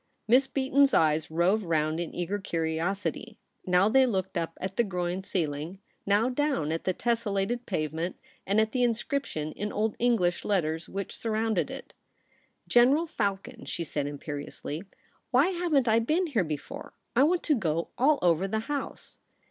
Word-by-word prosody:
Miss 255 +4 +5
Beaton's 275 +1 +3
eyes 155 -1 +3
roved 180 +7 +2
round 155 -2 0
In 170 - -3
eager 180 +4 -2
curiosity. 175 +6 -2 0.3
Now 180 +2 +4
they 260 +4 +5
looked 190 -5 -2
up 165 -1 -2
at 190 0 -4
the 235 - +3
groined 180 -2 -3
celling; 155 +1 -2 0.3
now 205 +4 +3
down 260 - 0
at 165 - -3
the 185 - +1
tessellated 230 0 -1
pave 155 -5 -1
ment 165 +3 -3 0.3
and 200 +3 +3
at 220 0 +2
the 255 - 0
Inscription 235 - -1
in 210 +5 -4
Old 215 0 0
English 215 -8 +2
letters 165 -5 -1
which 195 0 -5
surrounded 220 -1 0
It. 270 0 -9 0.4
' - - -39
General 275 +7 +6
Falcon,' 200 - -3
she 170 - -3
said 145 -2 -2
imperiously, 145 +1 -5 0.3
' - - -38
why 270 +7 +4
haven't 340 -8 +1
I 225 0 +5
been 310 +11 +1
here 255 - +1
before? 150 -3 -6 0.2
I 250 - +5
want 340 +5 +3
to 310 - +3
go 170 - -1
all 290 +4 +4
over 175 +2 +3
the 220 +2 -1
House.' 285 +3 -5
200 Hz, 170 wpm, -28 LUFS, 170-245 Hz, 0.4 s, General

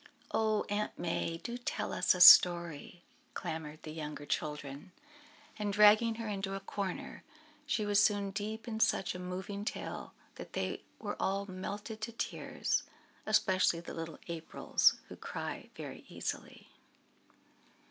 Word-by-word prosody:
"Oh, 215 -1 +1
Aunt 210 +1 -2
May! 165 -1 -2
do 235 +8 -6
tell 245 - -3
us - - +3
a 180 - -2
story," 175 -1 +7 0.3
clamoured 155 -1 -5
the 155 - -7
younger 150 -2 -6
children, 150 +3 -4 0.7
and 205 -1 -1
dragging 210 +2 +6
her 230 0 -5
into 195 -1 -3
a - - -3
corner 195 -1 -5 0.4
she 220 -7 0
was 205 0 +4
soon 200 -2 +2
deep 215 +3 -5
in 220 -2 -3
such 195 - +2
a 180 - -7
moving 190 +3 -5
tale - - -5 0.2
that - - -9
they - - -2 0.2
were - - -4
all 195 +1 0
melted 200 +3 -6
to 230 - -3
tears, 230 - -2 0.5
especially 185 -5 +3
the 170 - -8
little 165 -1 -6
Aprils, 165 -2 +2
who - - -9
cry - - -6
very - - -8
easily. - - -6
195 Hz, 140 wpm, -33 LUFS, 170-210 Hz, 0.7 s, story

